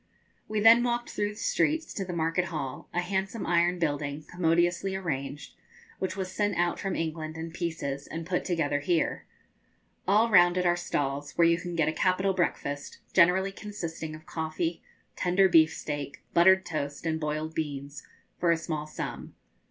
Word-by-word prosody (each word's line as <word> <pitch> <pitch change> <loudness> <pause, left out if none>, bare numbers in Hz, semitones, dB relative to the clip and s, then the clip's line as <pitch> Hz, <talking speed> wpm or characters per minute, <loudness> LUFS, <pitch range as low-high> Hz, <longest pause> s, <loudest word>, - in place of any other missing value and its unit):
We 215 0 -1
then 225 +2 +8
walked 240 0 -1
through 205 0 -1
the 210 - -9
streets 310 +8 0
to 195 - -3
the 185 - -5
market 165 +1 0
hall, 145 -6 -5
a 175 - 0
handsome 190 +3 -2
iron 175 +1 +2
building, 150 -2 -2
commodiously 175 +2 +1
arranged, 145 -6 -4 0.5
which 190 0 -2
was 185 -1 -3
sent 205 +1 0
out 175 0 +1
from 195 -1 -2
England 160 -1 -3
in 165 +1 -5
pieces, 160 -5 -4
and 165 0 -5
put 180 +1 -1
together 155 -5 0
here. 165 +2 0 0.8
All 215 +4 +4
round 175 -2 +6
it 180 - +1
are 175 0 +4
stalls, 145 -4 -2
where 170 -1 +4
you 170 0 +3
can 175 0 -5
get 160 -2 +2
a 155 - +1
capital 185 +2 +1
breakfast, 145 -5 -2 0.2
generally 190 +2 +4
consisting 165 -6 -6
of 155 +1 -13
coffee, 160 +1 -3 0.3
tender 185 +2 +3
beef 160 -3 +6
steak, 145 -2 -5
buttered 190 +2 +6
toast, 145 -1 -4
and 160 -1 0
boiled 155 +1 -2
beans, 145 -2 -4 0.4
for 175 - +2
a 165 - +3
small 155 -2 -4
sum. 155 - -6
170 Hz, 170 wpm, -28 LUFS, 155-185 Hz, 0.8 s, then